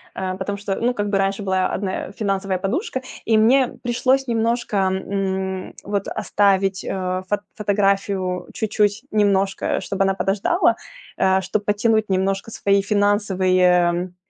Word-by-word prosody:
э, 185 -1 -3
потому 200 +1 -3
что, 200 -1 -3
ну, 245 +1 +1
как 205 0 -1
бы 200 - +1
раньше 195 +1 0
была 190 -1 +1
одна, 190 -1 -2 0.2
э, - - -10
финансовая 195 -2 -1
подушка, 260 - -2 0.2
и 220 -1 +3
мне 250 +4 +5 0.2
пришлось 255 +3 +1
немножко, 230 -1 0
м, 190 0 -2
вот 200 -1 -2
оставить, 195 -2 +1
э, 185 -1 -3
фот 205 - +1 0.2
фотографию 195 -3 0
чуть-чуть 210 0 0
немножко, 200 -2 +1
чтобы 195 0 -1
она 195 - +2
подождала, 195 - +1 0.4
э, 190 0 +3
чтоб 190 +3 -2
подтянуть 220 +1 +1
немножко 195 +2 0
свои 200 -2 +2
финансовые, 200 -3 +2
м, 180 0 +2
195 Hz, 145 wpm, -21 LUFS, 190-210 Hz, 0.4 s, мне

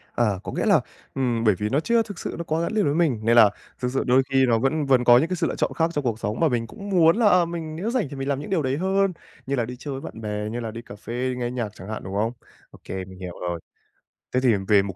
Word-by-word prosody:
Ờ, 105 -6 +1
có - - -5
nghĩa - - -1
là, - - +5 0.3
ừm, 120 -4 0
bởi 105 -4 +4
vì 105 +3 -2
nó 135 - +2
chưa 230 +6 +2
thực 205 -4 -9
sự - - -4
nó 170 - -3
quá 160 +1 -1
gắn 170 - -1
liền 215 -3 +2
với 145 - +2
mình, 155 -9 +2
nên 115 +1 +4
là 110 -4 +8 0.3
thực 125 -1 -1
sự 135 - +1
đôi 130 +2 +4
khi 135 -1 +4
nó 115 -3 +3
vẫn 145 +4 +1
vẫn 130 -2 +4
có 120 0 +7
những 150 +7 +2
cái 185 - 0
sự 170 -1 0
lựa - - -3
chọn - - 0
khác 165 0 +2
trong 145 -3 -1
cuộc 115 -2 -1
sống 105 +1 -3
mà 165 - +4
mình 120 -3 -1
cũng 200 - -9
muốn 170 0 +5
là, 230 - +3
ờ, 180 -3 +5
mình 165 -2 -5
nếu 200 +8 -2
rảnh 235 - 0
thì 140 - -7
mình 135 0 -4
làm 140 -1 0
những 150 - -7
điều 185 -5 +1
đấy 135 0 -1
hơn, 190 +1 +1 0.3
như 140 - -1
là 120 -3 0
đi 125 +1 -7
chơi 145 - -6
với - - -12
bạn 110 - -8
bè, 105 0 -3
như 120 +2 -4
là 115 -2 -4
đi 115 - -7
cà 105 - -11
phê, 125 +4 -3
nghe 120 -1 -2
nhạc 120 -4 -2
chẳng 95 +3 -10
hạn, 110 - -5
đúng 95 - -7
không? 110 +3 +1 0.4
Ô - - -15
kê, 95 -1 -5
mình 95 0 -13
hiểu 90 -2 -6
rồi. 85 -1 -2 0.7
Thế 125 - +3
thì 125 -3 +4
về 105 -2 +6
mục 95 -2 -5
130 Hz, 315 wpm, -24 LUFS, 110-165 Hz, 0.7 s, là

